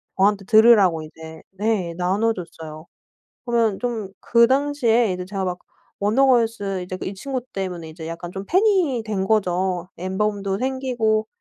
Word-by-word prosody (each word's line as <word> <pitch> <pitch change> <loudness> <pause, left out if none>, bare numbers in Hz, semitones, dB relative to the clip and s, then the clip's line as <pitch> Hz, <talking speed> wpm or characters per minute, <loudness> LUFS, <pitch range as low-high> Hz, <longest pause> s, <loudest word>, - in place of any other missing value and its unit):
저한테 195 0 +2
들으라고 215 -6 +5
이제 160 +1 -11
네 195 -3 -1
나눠줬어요. 180 -5 -2 0.6
그러면 230 -4 +1
좀 225 -5 -3
그 235 0 +4
당시에 255 -5 +2
이제 180 0 -5
제가 195 0 -4
막 180 0 -3 0.4
원더걸스 225 -4 +2
이제 185 +1 -6
이 195 - -4
친구 260 +6 -4
때문에 180 -4 -4
이제 160 0 -9
약간 170 +1 -6
좀 195 +1 -6
팬이 365 - +2
된 195 -3 -1
거죠. 185 -3 0
앨범도 195 +1 -2
생기고 245 -4 0
200 Hz, 295 characters per minute, -22 LUFS, 180-235 Hz, 0.6 s, 들으라고